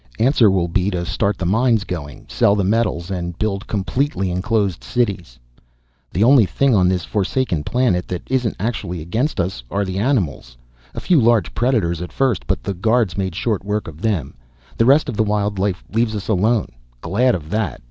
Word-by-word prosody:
Answer 120 -2 +4
will 95 -3 +1
be 90 +3 0
to 90 -3 -3
start 100 +3 -1
the 90 - -3
mines 115 +3 +2
going, 80 -8 -7
sell 100 - +2
the 100 - 0
metals 100 -3 0
and 85 -2 -4
build 100 -2 -2
completely 105 -1 -1
enclosed 95 0 -1
cities._ 100 - -2 0.7
_The 95 - +1
only 125 -5 +6
thing 140 +5 +2
on 95 -4 +4
this 90 -2 0
forsaken 100 - -1
planet 115 -5 0
that 90 -1 -4
isn't 125 -3 -1
actually 100 -5 -3
against 115 - -2
us 85 -8 -2
are 100 0 -1
the 95 0 -3
animals. 90 - -1 0.4
A - - -3
few 170 -7 +3
large 115 -2 +2
predators 110 -9 0
at 90 - -6
first, 130 -8 0
but 95 +1 -1
the 100 - -2
guards 110 0 +1
made 95 -3 -2
short 105 -1 -1
work 105 +1 -2
of 80 +1 -10
them. 100 - -1 0.4
The 115 - +2
rest 145 +3 +5
of 120 -6 -4
the 110 - +3
wild 105 -1 -1
life 95 -1 -1
leaves 110 -1 +1
us 100 - -5
alone. 110 +1 +2 0.3
Glad 125 +5 +2
of 80 -2 -7
that! 105 -6 -1
100 Hz, 190 wpm, -20 LUFS, 90-115 Hz, 0.7 s, only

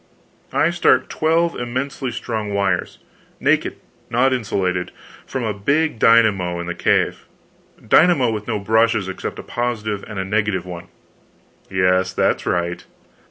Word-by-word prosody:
"I 160 - +2
start 170 0 +3
twelve 165 +2 +1
immensely 130 +2 -3
strong 110 -4 -4
wires 100 0 0 0.4
naked, - - +1 0.3
not 130 +3 +2
insulated 95 -7 -1 0.4
from 130 -2 -3
a 110 -2 -1
big 140 +7 0
dynamo 100 -7 +4
in 85 - -4
the 85 - -3
cave - - 0 0.6
dynamo 145 -3 +5
with 105 -1 -5
no 110 -3 -1
brushes 110 0 +2
except 95 - -5
a - - -7
positive 110 -4 -3
and 105 - -8
a 95 - -2
negative 105 -2 0
one 90 -1 -8 0.5
" - - -35
"Yes, 95 0 +2
that's - - 0
right." 85 0 -1
110 Hz, 140 wpm, -20 LUFS, 95-125 Hz, 0.6 s, dynamo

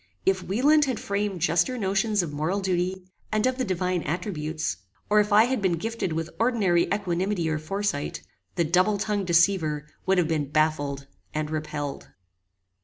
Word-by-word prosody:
If 190 -1 +2
Wieland 285 +11 +3
had 255 -5 -2
framed 200 -3 -2
juster 175 +9 +2
notions 200 0 +1
of 155 -4 -5
moral 160 +7 -1
duty, 185 0 -1 0.3
and 215 +1 +1
of 255 0 0
the - - +2
divine 185 -3 -1
attributes; 155 - -3 0.3
or 210 - +6
if 210 0 +1
I 210 +2 +7
had 250 -1 0
been 190 -3 +2
gifted 220 +2 -2
with 165 +1 -3
ordinary 210 -8 +3
equanimity 190 -2 0
or 155 - -1
foresight, 195 -1 -3 0.3
the 175 - +2
double 185 +6 +3
tongued 205 -1 -1
deceiver 170 -4 +2 0.2
would 190 0 +3
have 175 -3 +3
been 155 -4 -1
baffled 145 -2 0 0.3
and 155 0 -2
repelled. 150 -2 -4
185 Hz, 165 wpm, -26 LUFS, 160-205 Hz, 0.3 s, I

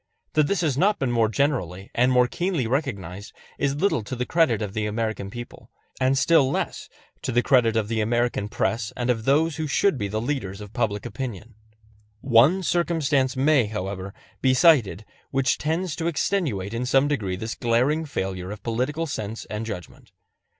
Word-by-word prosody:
That 155 -2 +3
this 200 +1 0
has 145 -5 0
not 205 +4 +3
been 135 -3 -1
more 115 -2 +2
generally 105 - -1
and 125 +2 +3
more 125 -1 +4
keenly 175 -1 -1
recognized 105 - -3 0.3
is 140 0 +1
little 150 - +1
to 130 - -5
the 125 0 -2
credit 160 -9 +2
of 105 -3 -4
the 105 -1 -1
American 110 -2 -3
people, 120 +3 -9 0.3
and 130 +1 +2
still 150 -2 +4
less - - -3 0.3
to - - -2
the 120 +1 +2
credit 120 -4 +3
of 110 -2 +1
the 110 0 -1
American 120 -1 0
press 115 0 -1
and 125 0 +1
of 115 -2 -3
those 150 +3 +2
who 155 -1 -2
should 150 0 +2
be 100 - -1
the 110 +2 -2
leaders 110 -6 -3
of 105 0 -10
public 105 -3 -1
opinion. 115 -2 -6 0.7
One 135 - +4
circumstance 150 -7 +1
may, 135 -4 +3
however, 95 -2 -5 0.3
be 130 -1 +3
cited 125 - +4 0.2
which 135 -1 +1
tends 160 +2 -1
to 165 - -1
extenuate 140 - -1
in 120 +2 -2
some 135 +2 +4
degree 110 -11 -1
this 110 +5 -4
glaring 130 +7 +1
failure 95 -9 -4
of 105 +1 -8
political 130 +8 -1
sense 110 -7 -5
and 105 +1 -4
judgment. 90 -6 -8
125 Hz, 180 wpm, -24 LUFS, 110-145 Hz, 0.7 s, more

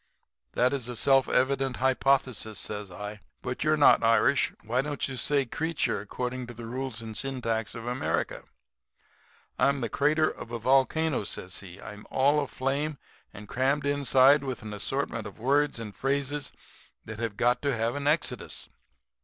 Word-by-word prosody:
"'That's 125 0 +1
a 125 - -5
self 135 +3 +3
evident 135 0 +1
hypothesis,' 130 -4 +1
says 105 -2 -4
I. 105 +3 -7 0.2
'But 125 - -3
you're 155 0 +3
not 145 - +6
Irish. 115 +4 +3
Why 120 +4 +1
don't 145 +1 -2
you 135 - -5
say 140 +3 +1
'creature,' 160 -1 -1
according 125 +4 -4
to 120 - -9
the 115 +1 -8
rules 125 -1 -4
and 110 -1 -7
syntax 115 -4 -2
of 115 0 -7
America?' 125 +1 -2 1.1
"'I'm 140 0 +3
the 115 - -1
crater 150 +6 +2
of - - -6
a 120 - -2
volcano,' 135 +4 +2
says 95 -1 -4
he. 95 -1 -11
'I'm 105 0 -10
all 140 +3 +3
aflame 140 +2 -2 0.3
and 105 0 -11
crammed 135 +5 +1
inside 140 0 +5
with 130 -4 -4
an 105 -1 -6
assortment 115 0 -2
of 100 - -11
words 140 +5 +2
and 110 -3 -7
phrases 140 +1 -1 0.5
that 110 -1 -7
have 110 -3 -3
got 120 +1 +2
to 140 -3 0
have 115 +1 0
an 145 0 -3
exodus. 145 -6 -1
130 Hz, 160 wpm, -28 LUFS, 115-140 Hz, 1.1 s, not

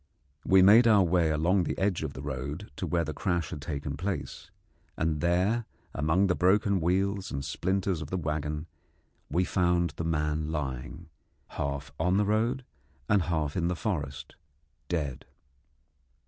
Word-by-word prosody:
We 95 -1 +5
made 110 +5 +7
our 105 -3 +6
way 85 -2 +2
along 85 +5 +2
the - - -3
edge 95 -2 0
of 75 -3 -4
the 65 - -8
road 70 +7 -5
to - - -3
where 85 -1 +1
the 80 - -4
crash 85 0 -1
had 75 - -6
taken 70 -1 -4
place, 80 -5 -4 0.5
and 80 -2 0
there 95 +8 +2 0.3
among 80 +7 +2
the 95 - +2
broken 100 +1 +3
wheels 95 +3 0
and 70 0 -3
splinters 95 +3 -1
of 75 - -6
the 95 - -1
waggon 75 -1 -2 0.6
we 90 +5 +1
found 85 -3 +1
the - - -2
man 75 -1 -1
lying, 65 -5 -5 0.4
half 70 0 -4
on 90 +4 +2
the 105 - +3
road 115 +5 0 0.4
and 100 -1 +4
half 80 -4 -1
in 85 -2 +1
the 90 - 0
forest, 75 - -4 0.5
dead. 75 -7 -3
85 Hz, 160 wpm, -29 LUFS, 75-95 Hz, 0.6 s, made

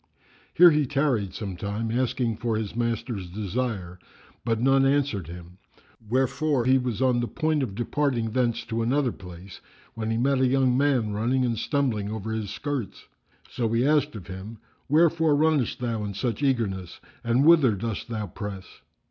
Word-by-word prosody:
Here 175 0 +8
he 150 -2 +1
tarried 130 -9 0
some 100 -4 -5
time, 105 +5 -3
asking 120 -2 0
for 115 -2 -1
his 110 -1 -4
master's 115 -5 -2
desire, 100 -2 -3 0.4
but 115 -2 0
none 135 +2 +4
answered 135 - +1
him, 90 +2 -11 0.5
wherefore 135 +1 +1
he 130 +1 +4
was 125 -1 -2
on 125 -2 +3
the 120 - -1
point 155 0 0
of 110 -8 -3
departing 120 -1 -1
thence 120 -1 0
to 115 0 -2
another 130 +2 +1
place, 90 -1 -11 0.3
when 110 -1 -4
he 115 - 0
met 135 +2 +2
a 130 - +4
young 130 -1 +2
man 130 -6 +1
running 125 +5 +1
and 120 -2 0
stumbling 120 -9 -1
over 110 0 -4
his 110 -2 -3
skirts. 140 -7 -4 0.4
So 115 -4 -2
he 120 +2 +2
asked 150 -2 +2
of 100 -5 -8
him, 95 +4 -8 0.3
"Wherefore 160 0 +4
runnest 145 -6 +2
thou 115 -3 -2
in 100 -1 -5
such 115 +2 -2
eagerness 105 -10 -1 0.2
and 120 +4 +2
whither 155 -9 +6
dost 110 +3 -4
thou 110 -2 -3
press?" 100 +1 -7
120 Hz, 170 wpm, -26 LUFS, 105-135 Hz, 0.5 s, Here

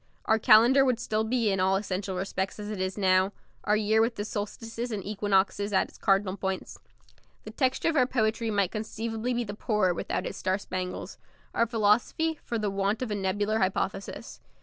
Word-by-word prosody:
Our 220 0 +3
calendar 235 +5 +6
would 250 -3 +1
still 215 -1 -1
be 225 -1 +1
in 195 - 0
all 190 +1 +3
essential 195 -1 -2
respects 190 +1 -3
as 210 0 -6
it 200 -3 -4
is 185 +1 -2
now; 190 0 +3 0.3
our 210 +1 +3
year 215 +1 +3
with 230 +1 +1
the 205 - -4
solstices 225 +3 -5
and 205 -3 -4
equinoxes 205 0 0
as 190 - +2
its - - -17
cardinal 195 0 +2
points. 190 -1 -4 0.6
The - - -8
texture 260 +3 +1
of 325 - -1
our 255 -4 +4
poetry 225 -2 0
might 200 -3 +1
conceivably 225 +2 -3
be 240 - 0
the 205 -3 -6
poorer 210 -3 +1
without - - -3
its - - -5
star 185 +1 0
spangles; 185 -2 -5 0.3
our 230 - +2
philosophy, 235 +9 +1
for 235 - -3
the 210 -2 -1
want 200 +4 0
of 235 - -4
a - - 0
nebular 205 +3 0
hypothesis. 195 0 -2
210 Hz, 195 wpm, -28 LUFS, 195-225 Hz, 0.6 s, calendar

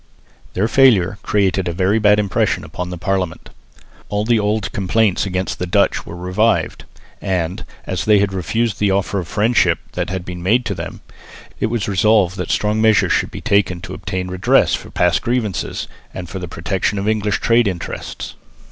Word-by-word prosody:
Their 100 +4 +1
failure 110 -7 +4
created 95 -3 +1
a 85 - -1
very 95 +5 +2
bad 105 -1 +5
impression 105 -2 0
upon 90 0 -6
the 90 - -5
Parliament. 90 -1 -2 0.6
All 105 +1 -1
the 115 -1 +3
old 105 0 -1
complaints 100 +1 +1
against 95 0 -3
the 90 - -2
Dutch 100 +3 +1
were 85 - -7
revived; 90 +6 0 0.4
and, 95 0 -2 0.2
as 95 - -3
they 105 -1 +5
had 100 -1 +1
refused 110 +4 -1
the 105 - +2
offer 100 +1 0
of 85 - -5
friendship 110 +4 +2
that - - -3
had 95 -1 -4
been 90 -1 -6
made 115 +7 +2
to 105 - -1
them, 85 -3 -7 0.6
it - - +1
was 115 -2 -2
resolved 100 -1 +3
that - - -4
strong 105 +1 +1
measures 110 -2 +4
should - - +1
be - - -8
taken 95 -3 +1
to - - -7
obtain 95 -1 -4
redress 90 -1 +2
for - - -3
past 90 -1 +1
grievances 120 -5 -2 0.3
and 90 -3 -6
for 95 - -5
the 90 - -5
protection 90 +5 -2
of 100 +1 -2
English 105 -1 0
trade 115 -1 +3
interests. 90 -3 -5
100 Hz, 185 wpm, -19 LUFS, 90-105 Hz, 0.6 s, bad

